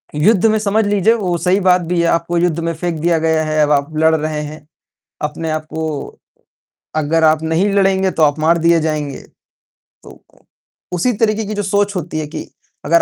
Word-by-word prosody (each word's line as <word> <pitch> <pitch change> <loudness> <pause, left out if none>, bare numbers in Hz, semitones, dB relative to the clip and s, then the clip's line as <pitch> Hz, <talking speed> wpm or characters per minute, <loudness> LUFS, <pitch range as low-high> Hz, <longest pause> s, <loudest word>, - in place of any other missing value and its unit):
युद्ध 195 +7 +3
में 220 0 +3
समझ 215 +1 +1
लीजिए, 205 +2 +3
वो 185 -6 -1
सही 180 +3 +1
बात 185 -2 +3
भी 175 0 -2
है 170 - +1
आपको 170 +1 0
युद्ध 170 -2 0
में 165 0 -2
फेंक 165 -1 -4
दिया 165 0 +1
गया 160 0 +1
है, 155 0 0
अब 150 - +1
आप 145 +2 0
लड़ 160 +1 +4
रहे 155 -1 -2
हैं 150 0 -9 0.6
अपने 155 +2 -3
आप 155 0 -3
को 160 -2 -4 0.8
अगर 160 +2 +1
आप 155 0 +3
नहीं 160 +5 +1
लड़ेंगे 190 -1 +2
तो 165 - -1
आप 145 0 +3
मार 165 +2 +2
दिए 170 0 +3
जाएँगे। 150 -3 -3 0.8
तो - - -13
उ - - -19 0.5
उसी 180 +8 +1
तरीके 220 0 0
की 215 - -4
जो 205 - -2
सोच 200 +1 0
होती 165 -3 -4
है 155 - -3
कि 150 - -7 0.4
अगर 170 +3 +4
165 Hz, 205 wpm, -17 LUFS, 155-190 Hz, 0.8 s, लड़